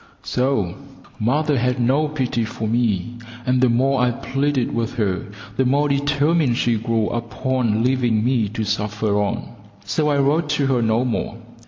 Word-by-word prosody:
So! 125 -9 0 0.4
Mother 145 +5 +1
had 125 +1 0
no 135 +6 +2
pity 130 -5 -1
for 110 0 -4
me, 115 -1 0 0.3
and 125 0 +2
the 130 - +4
more 130 +2 +2
I 125 - +3
pleaded 135 +2 -1
with 115 +1 -2
her 100 -6 -1 0.3
the 130 - +3
more 140 +3 +2
determined 145 -1 +2
she 120 -1 +2
grew 115 -1 0
upon 115 -1 -1
leaving 120 -4 +1
me 120 -5 +1
to 110 +1 -3
suffer 105 0 0
on, 100 - -3 0.4
so 150 -1 0
I 145 - +2
wrote 145 +3 +2
to 140 - +1
her 130 -3 +2
no 115 +2 +2
more. 120 - -2
125 Hz, 165 wpm, -21 LUFS, 115-135 Hz, 0.4 s, the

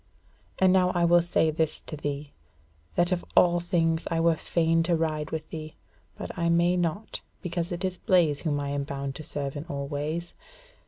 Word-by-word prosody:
And 185 -1 +5
now 185 -1 +4
I 175 -1 +3
will 175 0 +6
say 165 -2 +2
this 160 0 0
to - - -7
thee, 145 0 -4 0.6
that 175 +1 +2
of 180 -1 0
all 175 -1 +6
things 165 -2 0
I 165 - 0
were 165 0 +4
fain 165 +1 +1
to 170 +1 +2
ride 155 -2 -1
with 160 -1 -5
thee, 155 -1 -7 0.4
but - - -6
I 170 0 0
may 170 +1 +3
not, 175 +4 -2 0.2
because 175 -1 -2
it 175 +2 -2
is 185 -1 -3
Blaise 165 -6 +3
whom 150 -3 0
I 140 0 -3
am 140 0 -1
bound 140 -1 -4
to 155 - -8
serve 145 -2 -4
in 145 +2 -5
all 140 -4 -4
ways. 155 +4 -3
165 Hz, 200 wpm, -27 LUFS, 150-175 Hz, 0.6 s, will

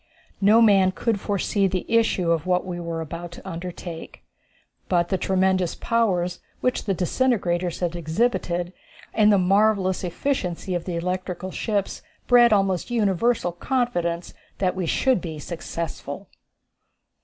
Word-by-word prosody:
No 215 +4 +6
man 195 -4 +5
could 225 +1 -1
foresee 200 0 0
the 185 -1 -2
issue 225 -7 +2
of 165 +1 0
what 180 0 +1
we 175 -1 -5
were 165 -1 -4
about 170 +2 -6
to 190 - -11
undertake, 175 -1 -7 0.7
but 175 -2 +2
the 190 - +1
tremendous 190 -2 +1
powers 180 -7 0 0.2
which 250 - -1
the 195 -3 0
disintegrators 180 -3 0
had 175 -1 -1
exhibited 175 0 -1 0.4
and 215 -1 +5
the 200 - +5
marvellous 195 0 +2
efficiency 180 -2 -2
of 175 -1 -2
the 180 - -3
electrical 180 +1 -3
ships 205 -2 -2 0.2
bred 240 -1 +6
almost 195 -2 +1
universal 225 -2 +1
confidence 175 -5 -1 0.2
that 185 -1 0
we 185 -3 -2
should 260 - +2
be 160 -3 -6
successful. 165 +1 -6
185 Hz, 135 wpm, -24 LUFS, 175-210 Hz, 0.7 s, No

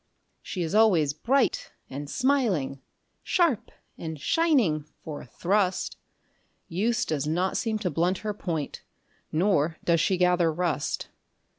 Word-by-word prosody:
She 180 - -4
is 160 - -3
always 185 -10 +4
bright 255 - +1
and 140 +2 -6
smiling, 205 - +1 0.4
sharp 335 - +1 0.3
and 160 -2 -5
shining 240 - +2 0.2
for 155 -2 -6
a - - -12
thrust; 185 - 0 0.7
Use 225 +8 0
does 150 -2 -1
not 180 +4 0
seem 225 -2 0
to 195 -5 -2
blunt 175 +5 +1
her 210 - 0
point, 165 -7 -4 0.5
nor 165 -2 +2
does 170 -2 +3
she 185 +2 +2
gather 180 -2 +3
rust. 160 -4 -2
180 Hz, 130 wpm, -27 LUFS, 155-215 Hz, 0.7 s, always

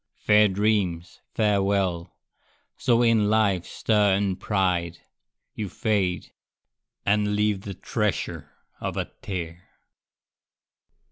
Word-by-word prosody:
Fair 105 0 +4
dreams, 95 -4 -1 0.2
farewell! 100 -4 0 0.6
So 120 -1 +2
in 110 -3 +3
life's 100 -5 +1
stir 105 -3 +2
and 95 -2 -1
pride 90 -4 0 0.6
You 105 -3 -4
fade, 100 -5 -1 0.7
and 105 0 +2
leave 105 -2 +1
the 100 -1 -7
treasure 105 +2 -2 0.3
of - - -4
a - - -3
tear! 85 -3 -5
100 Hz, 95 wpm, -25 LUFS, 90-105 Hz, 0.7 s, Fair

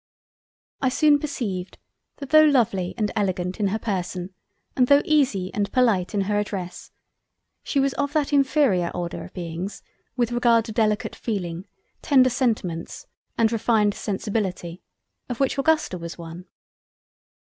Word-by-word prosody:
I 260 - +2
soon 290 +2 +4
perceived 200 -11 -4 0.4
that 280 -2 -9
tho' 310 0 +8
Lovely 225 -11 +1
and 210 -2 0
Elegant 185 -2 -1
in 205 - +2
her 200 +3 -1
Person 185 -3 -4 0.4
and 250 -1 +3
tho' 285 +2 +5
Easy 260 -12 +1
and 205 -2 -1
Polite 225 -6 +2
in 200 - +2
her 205 +1 0
Address, 185 -4 -5 0.7
she 280 - -1
was 275 0 +1
of 285 0 -2
that 300 -2 0
inferior 270 - +3
order 175 -1 -4
of - - -14
Beings 175 +2 -6 0.3
with 240 -1 +1
regard 235 -2 +3
to - - -6
Delicate 215 -1 0
Feeling, 185 -4 -4 0.3
tender 260 -3 +4
Sentiments, 215 -10 -2 0.3
and 225 -1 +3
refined 220 -2 +2
Sensibility, 195 -4 -3 0.5
of 245 - -4
which 275 0 0
Augusta 305 - +1
was 170 0 -7
one. 170 +2 -9
210 Hz, 145 wpm, -24 LUFS, 185-255 Hz, 0.7 s, tho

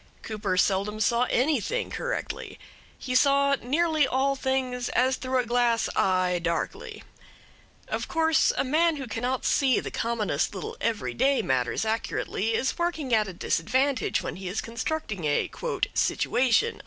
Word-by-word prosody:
Cooper 205 -4 -2
seldom 200 +3 +1
saw 235 +3 +2
anything 300 - 0
correctly. - - -4 0.4
He 255 - -5
saw 280 +1 +4
nearly 310 +2 +2
all 270 +2 +1
things 260 -2 -1
as 255 +2 +2
through 260 0 -2
a 250 - +1
glass 240 -1 +2
eye, 185 -1 +2
darkly. 170 -1 -3 0.8
Of - - -3
course 320 -1 +3
a - - +2
man 315 +5 +2
who 275 -2 -5
cannot 245 +3 -2
see 265 -3 +3
the - - -6
commonest 210 -8 -1
little 185 - -5
every 225 -2 -1
day 270 +2 +2
matters 130 - 0
accurately 220 0 -1
is 265 +8 -1
working 320 -7 -1
at 215 -2 +3
a 190 - -6
disadvantage 255 +10 0
when - - -5
he 190 -1 -7
is 195 +4 -2
constructing 230 - -3
a 145 -1 0 0.4
"situation." 260 - +1
245 Hz, 145 wpm, -26 LUFS, 210-275 Hz, 0.8 s, saw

